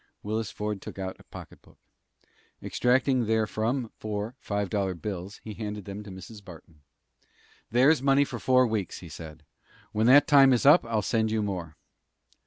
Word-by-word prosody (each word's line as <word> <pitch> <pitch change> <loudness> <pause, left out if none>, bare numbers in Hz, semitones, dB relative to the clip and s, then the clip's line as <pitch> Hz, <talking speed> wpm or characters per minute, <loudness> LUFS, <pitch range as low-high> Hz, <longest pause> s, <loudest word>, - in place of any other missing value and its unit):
Willis 110 0 -2
Ford 105 -2 -4
took - - -9
out 95 -1 -5
a - - -16
pocketbook. - - -13 0.8
Extracting 125 -1 +1
therefrom 110 +2 -1
four 105 +1 -4
five 100 -3 -2
dollar 95 -3 -1
bills, 95 +2 -6
he 110 - -7
handed 105 -2 -6
them 100 +1 -7
to 105 - -11
Mrs. 95 +3 -11
Barton. 80 -4 -14 0.9
"There's 130 +5 +4
money 140 +1 +4
for - - -7
four 130 0 +4
weeks," 110 -6 -3
he 85 - -10
said. 80 0 -10 0.5
"When 110 +2 +1
that 140 +3 +7
time 140 -4 +6
is 120 - 0
up 145 +5 +7
I'll 110 -2 0
send 110 0 0
you 110 -1 0
more." 90 -6 -5
110 Hz, 165 wpm, -27 LUFS, 100-125 Hz, 0.9 s, that